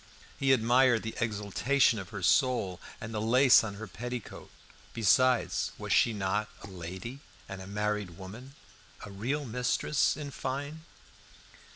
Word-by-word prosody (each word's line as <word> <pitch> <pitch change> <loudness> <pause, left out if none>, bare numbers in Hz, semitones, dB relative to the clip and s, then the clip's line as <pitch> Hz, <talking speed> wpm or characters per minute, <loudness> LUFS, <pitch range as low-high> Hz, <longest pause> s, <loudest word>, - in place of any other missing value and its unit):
He 135 -1 +3
admired 120 -1 +4
the 110 - -4
exaltation 115 +3 +1
of 95 -3 -8
her 100 -3 -7
soul 120 - +2 0.2
and 115 0 -7
the 105 - -2
lace 125 +4 +6
on 100 -2 -5
her 110 +2 -7
petticoat. 120 +5 -7 0.5
Besides, 125 +3 +2
was - - -2
she 120 - +4
not 105 0 -1
"a - - -8
lady" 95 +7 -7 0.3
and 95 -1 -7
a 95 - -9
married 105 -3 -2
woman 115 +9 -10 0.5
a 105 - -10
real 130 +9 -2
mistress, 125 +4 0
in 145 -2 -6
fine? 145 +5 -5
115 Hz, 145 wpm, -30 LUFS, 100-130 Hz, 0.5 s, lace